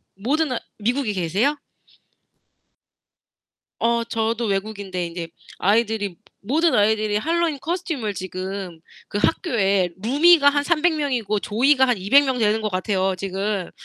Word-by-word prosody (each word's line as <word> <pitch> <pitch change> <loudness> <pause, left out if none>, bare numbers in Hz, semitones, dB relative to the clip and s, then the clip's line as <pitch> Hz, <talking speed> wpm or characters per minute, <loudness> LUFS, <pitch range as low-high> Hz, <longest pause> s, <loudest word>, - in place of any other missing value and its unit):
모든 275 +10 0 0.3
미국에 235 +1 -1
계세요? 200 - 0 2.2
어 235 0 +1
저도 230 0 -1
외국인데 195 -3 -3
이제 170 0 -6 0.3
아이들이 205 -2 +1 0.3
모든 315 +10 +1
아이들이 210 0 +2
핼러윈 330 +2 0
코스튬을 310 - -3
지금 185 -1 -6 0.3
그 205 - -3
학교에 200 - +1
루미가 290 +5 +5
한 285 0 0
300 340 +1 +2
명이고 245 -8 -1
조이가 265 +6 +3
한 245 - +2
200 275 +10 +4
명 260 -2 -1
되는 215 0 +2
것 215 -1 -2
같아요 190 0 0
지금. 195 0 -3
220 Hz, 260 characters per minute, -22 LUFS, 195-280 Hz, 2.2 s, 루미가